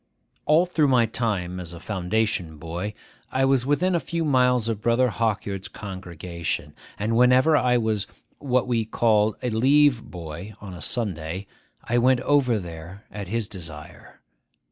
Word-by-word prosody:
All 155 +4 +5
through 165 -4 +2
my 125 -3 +4
time 100 -6 -2
as 85 -1 -7
a 85 - -9
foundation 95 -3 -1
boy, 85 +7 -5 0.4
I 135 0 +2
was 135 -1 +2
within 175 +6 +2
a 170 - +2
few 165 0 -2
miles 125 -4 +3
of 110 -2 -2
Brother 120 +2 +3
Hawkyard's 105 -4 -2
congregation; 90 -4 -5 0.2
and 110 +3 -1
whenever 125 +6 +5
I 125 -4 +3
was 110 -3 -1 0.3
what 130 -3 +1
we 120 -2 +1
called 110 -1 +2
a 125 - 0
leave 135 +2 +4
boy 85 +2 -8
on 100 -2 -9
a 85 - -9
Sunday, 90 -3 -3 0.4
I 120 +1 +1
went 125 +1 +3
over 135 -5 +3
there 85 +1 -8
at 100 -2 -6
his 110 +1 -2
desire. 80 -7 -9
110 Hz, 155 wpm, -24 LUFS, 95-125 Hz, 0.4 s, All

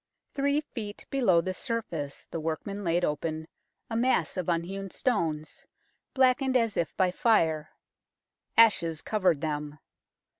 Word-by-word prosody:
Three 280 +1 +1
feet 215 -8 -7
below 215 -11 +4
the 185 +2 -3
surface 180 - -4
the 165 - -3
workmen 165 +6 -4
laid 175 0 +2
open 155 +1 -3 0.4
a 225 - -4
mass 235 -8 +1
of 180 -2 -2
unhewn 190 +4 -2
stones, 165 - -2 0.5
blackened 260 0 +4
as 230 -4 0
if 170 - -2
by 185 -2 +3
fire. 160 -8 +2 0.9
Ashes 170 -8 +4
covered 185 -9 +1
them. 150 -1 -3
185 Hz, 125 wpm, -28 LUFS, 160-230 Hz, 0.9 s, below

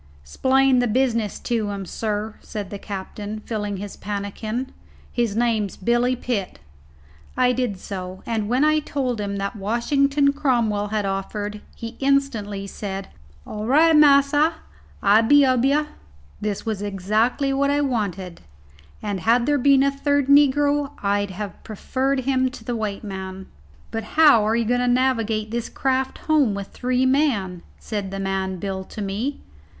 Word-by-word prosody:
"'Splain 260 - +3
the 245 - +2
business 230 -3 0
to 225 -3 -2
him, 200 -1 -4
sir," 215 +2 -3
said 205 -3 -6
the 200 - -6
captain, 205 +2 -6
filling 205 -3 -3
his 200 +1 -7
pannikin; 210 +5 -4 0.4
"his 235 -4 -1
name's 225 -4 0
Billy 240 +5 +1
Pitt." 235 -6 -3 0.8
I 250 0 +4
did 245 -5 -1
so; 185 -1 -7
and 220 -3 -2
when 255 +4 +2
I 310 0 +4
told 260 -6 -2
him 200 -1 -3
that 200 +3 -3
Washington 275 +7 +1
Cromwell 235 -8 +1
had 210 -1 -1
offered, 205 +2 -3
he 230 0 -8
instantly 255 -8 0
said, 195 -1 -6 0.4
"All 210 +1 -5
right, 315 +5 +5
massa, 290 +1 +5 0.5
I'll 205 +2 +6
be 285 +5 +5
ob 255 -2 +2
yah." 295 +2 +3 0.6
This 210 0 -3
was 215 -3 -2
exactly 215 +7 0
what 280 +1 +1
I 290 +1 +2
wanted, 200 -9 -2 0.6
and 205 -2 -2
had 235 +5 +3
there 290 +1 +2
been 275 +1 +5
a 275 - +3
third 285 0 +1
negro 285 0 +3
I'd 200 0 +1
have 195 +1 -7
preferred 260 +5 -1
him 260 0 +1
to 250 - -11
the 240 +1 -3
white 215 -2 -3
man. 190 -1 -6 0.5
"But 225 -1 -4
how 295 -9 +7
are 220 - +2
you 235 0 +1
going 245 +2 +1
to 250 - +1
navigate 230 -4 +1
this 235 0 -3
craft 265 0 -1
home 290 -10 +3
with 200 -1 -6
three 255 +1 0
men?" 245 - +1 0.2
said 205 -3 -4
the 195 +1 -5
man 190 -1 -2
"Bill" 190 0 -4
to 215 - -8
me. 215 +9 -3
225 Hz, 160 wpm, -23 LUFS, 205-270 Hz, 0.8 s, how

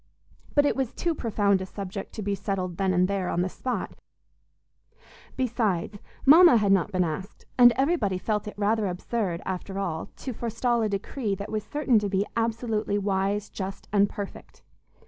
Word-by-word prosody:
But 290 -1 +5
it - - +2
was 265 -3 -1
too 340 -1 0
profound 205 -7 +1
a - - -3
subject 195 0 -6
to 215 - -5
be 200 0 -1
settled 185 -3 -3
then 195 -1 +1
and 180 0 +3
there, 195 -2 -1
on 175 - 0
the 185 - -1
spot; 255 +6 -4 1.4
besides, 215 -6 -1 0.3
Mama 325 0 +8
had 205 -2 +2
not 195 0 +3
been 185 -2 +2
asked, 180 +5 -5
and 245 -1 +8
everybody 265 - +1
felt 210 +2 -2
it 210 - -7
rather 210 +1 +1
absurd, 180 -1 -2
after 190 +1 -4
all, 170 -5 -3
to 260 - -6
forestall 235 +1 0
a 215 - +1
decree 205 +2 -2
that 200 +2 -7
was 215 -1 -2
certain 280 -6 +2
to 205 -1 -2
be 195 +1 +1
absolutely 225 -2 -1
wise, 200 +1 0
just 195 0 -6
and 200 -1 +4
perfect. 200 -1 -8
205 Hz, 175 wpm, -26 LUFS, 190-230 Hz, 1.4 s, Mama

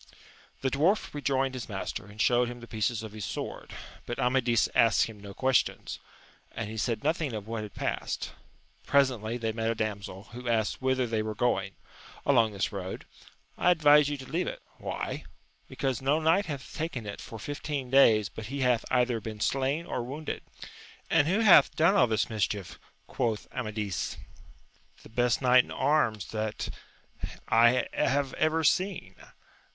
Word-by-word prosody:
The 130 - 0
dwarf 170 +11 +1
rejoined 135 -2 0
his 125 -3 -6
master, 95 0 -4
and 105 +1 -14
showed 120 +1 +3
him 120 0 -7
the 120 - -10
pieces 110 0 -1
of 110 - -7
his 105 -1 -7
sword, - - -5 0.4
but 120 - -3
Amadis 125 -2 +2
asked 115 -1 +5
him 110 -2 -10
no 100 -1 -10
questions, 130 -2 0 0.5
and 110 -2 -4
he 110 - -6
said 115 +4 -1
nothing 155 -3 0
of 105 -2 -5
what 115 -1 -3
had 105 -2 -8
passed. - - -3 0.6
Presently 125 -5 +2
they 115 -2 -1
met 115 0 -1
a 115 - 0
damsel, 100 -3 -4
who 125 0 -5
asked 110 0 0
whither 130 -1 +1
they 110 -2 -1
were 110 0 -4
going. 100 -5 0 0.3
— - - -19
^Along 115 -6 +4
this 100 -1 -2
road. 95 -2 -6 0.3
— 135 0 -37
I - - +4
advise 150 -4 +6
you 145 - -2
to 135 - -9
leave 165 +7 -2
it. - - -6
— - - -24
^Why - - -3
1 - - -16 0.2
— - - -39
Because 135 -3 -2
no 140 +4 +2
knight 165 +6 +3
hath 140 -4 -6
taken 155 -8 -3
it 100 - -6
for 115 - -8
fif 145 +7 -6
teen 140 -5 -3
days 110 -6 +6
but 110 -1 -8
he 140 +2 -4
hath 125 -3 +2
either 125 -2 +2
been 110 0 -7
slain 135 +8 0
^or 125 - -3
wounded. 145 +6 -5 0.7
And 155 -2 +4
who 195 +6 +2
hath 210 -5 +7
done 165 +5 +4
all 200 -11 +5
this 110 -2 +1
mischief? 105 -3 -2 0.3
quoth 115 -4 -2
Amadis. 105 -5 -3 0.9
The - - -13
best 120 +3 +1
knight 125 0 +6
in - - -16
arms 120 -10 +1
that 110 -1 -3 0.8
I 120 +2 +5
have 135 -1 +1
ever 160 +1 +1
seen. 180 - +1
125 Hz, 180 wpm, -29 LUFS, 110-140 Hz, 0.9 s, hath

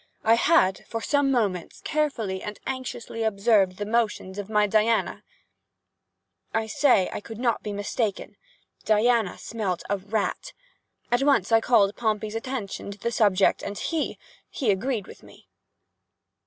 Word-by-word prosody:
I 225 - +5
had, 230 - +3
for 230 - -3
some 285 +3 +1
moments, 205 -9 -1
carefully 275 -12 -1
and 210 0 -7
anxiously 255 -3 -5
observed 200 -3 +2
the 205 - -3
motions 210 -3 -1
of 205 0 -6
my 210 -1 +3
Diana—I 220 +1 -4
say 220 -3 +3
that - - -7
I - - -2
could 225 +1 -9
not 235 -1 0
be 210 - -5
mistaken—Diana 220 - -1
smelt 200 -6 -3
a 200 - +2
rat! 205 +2 -3 0.6
At 245 +2 +3
once 275 -8 +2
I 225 0 +5
called 205 -4 +3
Pompey's 215 -2 -1
attention 225 -4 -5
to 200 - -8
the 235 - -2
subject, 205 -4 +3
and 200 - -5
he—he 300 -6 -3
agreed 210 +1 -1
with - - -13
me. - - -18
220 Hz, 140 wpm, -25 LUFS, 200-240 Hz, 0.6 s, I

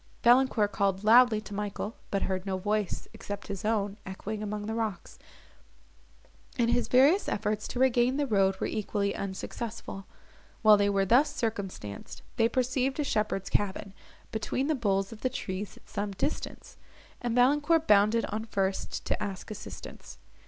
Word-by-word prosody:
Valancourt 240 -4 +4
called 195 -1 0
loudly 230 0 +6
to 215 -1 -10
Michael, 210 +2 -4
but 195 - 0
heard 185 -1 -2
no 190 -1 -2
voice, 205 +1 -1
except 205 0 -7
his 195 -2 -5
own, 210 -2 0
echoing 205 +3 -5
among 210 0 -4
the 220 - -3
rocks, 225 -3 -4 1.4
and 235 -1 +2
his 240 0 +1
various 280 +10 +4
efforts 210 0 -1
to - - -6
regain 255 0 +3
the 290 - +1
road 195 -5 +2
were - - -1
equally 205 -1 -1
unsuccessful. 195 +1 -6 0.6
While 215 -1 +8
they 205 0 +2
were 195 -1 +2
thus 250 +9 +4
circumstanced, 195 - -5
they 225 -1 +4
perceived 255 +2 0
a - - +2
shepherd's 210 -6 -1
cabin, 200 -1 -1 0.4
between 225 +4 -1
the 310 - +1
boles 195 -6 0
of 225 - -10
the 255 - +1
trees 200 -5 -5
at - - -20
some 205 -1 -3
distance, 285 +11 -4 0.4
and 240 -1 -1
Valancourt 295 +6 +3
bounded 210 +3 +4
on 220 +1 -3
first 195 -3 -2
to - - -1
ask 195 0 -6
assistance. 100 - -9
210 Hz, 160 wpm, -29 LUFS, 200-240 Hz, 1.4 s, While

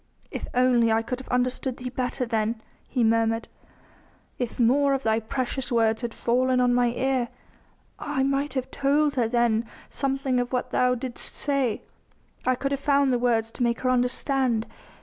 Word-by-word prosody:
"If - - -5
only 245 -2 +4
I 225 0 +2
could 250 +2 -4
have 260 - -11
understood 250 +1 -1
Thee 250 0 -6
better 255 0 -2
then," 225 -1 -1 0.3
he 250 -3 +1
murmured; 225 0 +2 0.9
"if 245 -1 -4
more 275 +4 +4
of 270 - -4
Thy 220 0 +2
precious 255 +3 -3
words 225 -1 +2
had 240 -2 -3
fallen 255 +2 +1
on 245 -1 +3
mine 245 -1 +2
ear.... 260 -1 0 0.7
I 285 -2 -1
might 275 +1 0
have 260 -1 -3
told 285 +1 +2
her 245 -4 +1
then 235 -1 +2 0.3
something 270 -2 0
of 245 0 -2
what 250 -1 -2
Thou 250 0 +2
didst 250 0 -3
say... 275 -6 0 0.6
I 255 - +4
could 275 +2 -3
have 280 0 -2
found 280 -2 +3
the 245 - +1
words 225 -2 +1
to - - -9
make 235 -1 +1
her 255 - +2
understand.... 250 -1 +1
250 Hz, 175 wpm, -25 LUFS, 235-265 Hz, 0.9 s, only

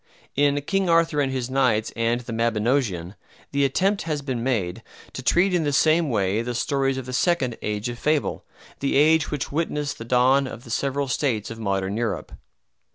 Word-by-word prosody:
In 145 0 +3
"King 195 +3 0
Arthur 165 -3 +3
and 135 -1 0
His 130 -2 -2
Knights" 125 -5 +1
and 115 +1 0
"The 115 -1 -7
Mabinogeon" 115 -5 0 0.4
the 140 0 +1
attempt 195 +9 +1
has 150 -3 -3
been 130 -4 -3
made 110 -9 -1 0.3
to - - -5
treat 180 +2 +3
in 175 -2 +2
the 145 - 0
same 155 +2 +3
way 105 -2 +1
the 120 +1 -4
stories 135 +1 0
of 130 - -5
the 130 - -6
second 130 -5 +1
"age 105 +2 -2
of 120 0 -6
fable," 150 -1 0 0.4
the 140 - 0
age 155 +2 +4
which 150 -3 -3
witnessed 150 -2 -2
the - - -5
dawn 130 +3 +3
of 125 - -9
the 115 - -10
several 140 +3 -1
states 125 -6 -1
of 115 - -8
Modern 100 -1 -1
Europe. 115 -2 -2
130 Hz, 190 wpm, -24 LUFS, 115-145 Hz, 0.4 s, age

